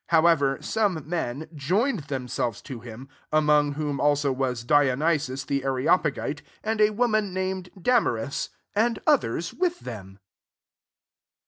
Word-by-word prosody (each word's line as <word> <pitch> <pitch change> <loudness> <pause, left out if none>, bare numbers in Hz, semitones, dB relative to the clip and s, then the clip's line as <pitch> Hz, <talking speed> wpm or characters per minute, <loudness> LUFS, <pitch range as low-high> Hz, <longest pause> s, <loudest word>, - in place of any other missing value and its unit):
34 165 - +5
However, 145 -5 +3
some 200 -9 0
men 155 -3 -3
joined 185 - 0
themselves 125 -5 -3
to 130 -5 -7
him, 120 +3 -10 0.2
among 150 -1 +3
whom 145 -1 -2
also 145 -1 +2
was 130 -3 -2
Diony 145 +3 +3
sius 130 -2 -5
the 140 -1 -1
Areopagite, 145 +2 +1 0.2
and 220 0 0
a 210 - +6
wo 235 +4 +1
man 215 -4 0
named 185 -1 -2
Damai^is, 160 - +1 0.2
and 225 +2 +2
others 130 +8 +1
with 355 -1 -1
them. 95 -4 -8
150 Hz, 135 wpm, -26 LUFS, 135-185 Hz, 0.2 s, a